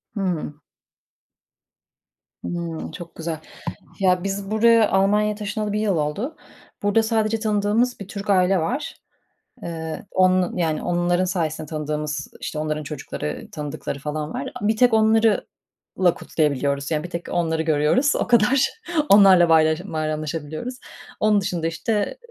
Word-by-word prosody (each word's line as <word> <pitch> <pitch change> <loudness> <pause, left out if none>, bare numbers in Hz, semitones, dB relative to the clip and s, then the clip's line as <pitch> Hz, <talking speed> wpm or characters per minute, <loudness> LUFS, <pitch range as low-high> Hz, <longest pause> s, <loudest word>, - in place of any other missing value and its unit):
Hıı. 180 -7 -2 1.9
Hımm. 170 -2 -4
Çok 170 +1 -10
güzel. 160 -1 -4 0.6
Ya, 180 -1 +2
biz 195 0 -3
buraya, 225 0 +4
Almanya'ya 210 +2 +2
taşınalı 210 0 -3
1 210 - 0
yıl 205 -4 +1
oldu. 165 - -2 0.5
Burada 205 +2 +3
sadece 220 0 0
tanıdığımız 215 +3 +1
bir 200 - -8
Türk 200 0 -5
aile 185 0 +4
var. 250 - -2 0.7
Eee, 160 0 -5
onun 185 -1 +2
yani 160 -3 0
onların 175 +1 +1
sayesinde 160 -4 -2
tanıdığımız, 150 -1 -3
işte, 155 - -4
onların 155 0 -2
çocukları, 150 +1 -5
tanıdıkları 150 -1 -5
falan 150 +1 -4
var. - - -4
Bir 215 +2 +1
tek 245 0 +4
onlarla 220 0 +4 0.7
kutlayabiliyoruz; 140 -2 -1
yani 155 -1 0
bir 175 - -6
tek 170 -1 -6
onları 160 -2 0
görüyoruz, 160 - +2
o - - -1
kadar. 245 +3 +4 0.4
Onlarla 195 -4 +7
bayram 160 +3 +3
bayramlaşabiliyoruz. 155 - -3 0.4
Onun 210 -1 +3
dışında, 170 -3 -2
işte, 210 - -2
180 Hz, 130 wpm, -22 LUFS, 155-210 Hz, 1.9 s, Onlarla